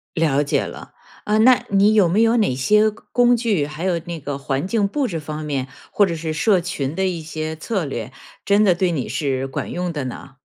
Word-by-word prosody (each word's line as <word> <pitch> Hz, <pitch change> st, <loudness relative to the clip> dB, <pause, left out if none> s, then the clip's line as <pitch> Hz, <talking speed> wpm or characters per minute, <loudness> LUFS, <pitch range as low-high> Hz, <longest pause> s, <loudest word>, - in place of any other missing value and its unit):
了 150 Hz, -4 st, +2 dB
解 145 Hz, -, 0 dB
了。 -, -, -9 dB, 0.3 s
呃， 210 Hz, +1 st, +1 dB
那 250 Hz, +2 st, +5 dB
你 200 Hz, +2 st, +4 dB
有 205 Hz, -4 st, +5 dB
没 190 Hz, +6 st, +2 dB
有 230 Hz, +1 st, +3 dB
哪 210 Hz, -, +2 dB
些 210 Hz, +12 st, +3 dB
工 245 Hz, +3 st, +1 dB
具， 215 Hz, -11 st, 0 dB
还 150 Hz, +3 st, -7 dB
有 180 Hz, -3 st, +1 dB
那 170 Hz, -2 st, -6 dB
个 145 Hz, 0 st, -4 dB
环 140 Hz, +2 st, -2 dB
境 205 Hz, 0 st, +1 dB
布 265 Hz, +6 st, -1 dB
置 170 Hz, -, -3 dB
方 155 Hz, 0 st, -6 dB
面， 140 Hz, -3 st, -2 dB, 0.2 s
或 205 Hz, -, +3 dB
者 170 Hz, -, -2 dB
是 160 Hz, 0 st, -4 dB
社 185 Hz, +4 st, +3 dB
群 155 Hz, -5 st, -3 dB
的 190 Hz, +1 st, 0 dB
一 180 Hz, -3 st, -2 dB
些 155 Hz, 0 st, -5 dB
策 190 Hz, +3 st, -2 dB
略 120 Hz, -2 st, -5 dB, 0.3 s
真 205 Hz, +1 st, +3 dB
的 190 Hz, -4 st, +4 dB
对 180 Hz, +1 st, 0 dB
你 140 Hz, -6 st, -3 dB
是 135 Hz, -3 st, -1 dB
管 135 Hz, -, -5 dB
用 180 Hz, -1 st, -2 dB
的 145 Hz, -4 st, -4 dB
呢？ 135 Hz, +2 st, -8 dB
170 Hz, 240 characters per minute, -21 LUFS, 145-205 Hz, 0.3 s, 那